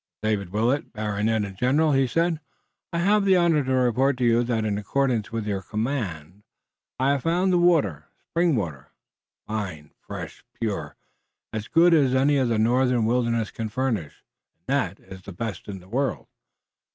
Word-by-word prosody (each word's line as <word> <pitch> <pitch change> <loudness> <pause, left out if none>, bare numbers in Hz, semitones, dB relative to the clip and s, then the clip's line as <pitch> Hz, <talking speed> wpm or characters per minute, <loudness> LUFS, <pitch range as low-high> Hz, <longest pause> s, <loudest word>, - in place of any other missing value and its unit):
"Sir 110 - +1
David 100 -4 -1
Willet, 115 +8 0
baronet 105 0 0
and 95 -1 -8
general," 140 +8 +2
he 135 -1 +3
said, 165 +3 0 0.5
"I 170 - -2
have 200 +4 +3
the 195 -1 +4
honor 165 -4 +3
to 130 - -3
report 130 +1 +2
to 125 - 0
you 120 0 +4
that 115 -2 -1
in 105 -1 -1
accordance 120 +1 0
with 115 -2 -3
your 100 -2 -2
command 105 - -4 0.6
I 130 +2 +2
have 140 -2 0
found 180 +5 +1
the 175 - +4
water, 155 - +2 0.2
spring 170 -2 +2
water, 80 - -4 0.6
fine, 95 -9 -5
fresh, - - -8 0.2
pure, 95 -11 -3 0.6
as 110 -1 -4
good 170 +1 +5
as 135 -5 +4
any 140 +2 +3
the 120 -3 +1
northern 120 +1 +2
wilderness 115 -1 0
can 110 -1 -4
furnish, 110 - -3 0.3
and 85 - -48
that 115 -9 -1
is 95 -1 -12
the 100 - -10
best 105 -1 -5
in 100 -2 -6
the 90 - -17
world. 130 +4 -1
115 Hz, 175 wpm, -25 LUFS, 105-140 Hz, 0.6 s, good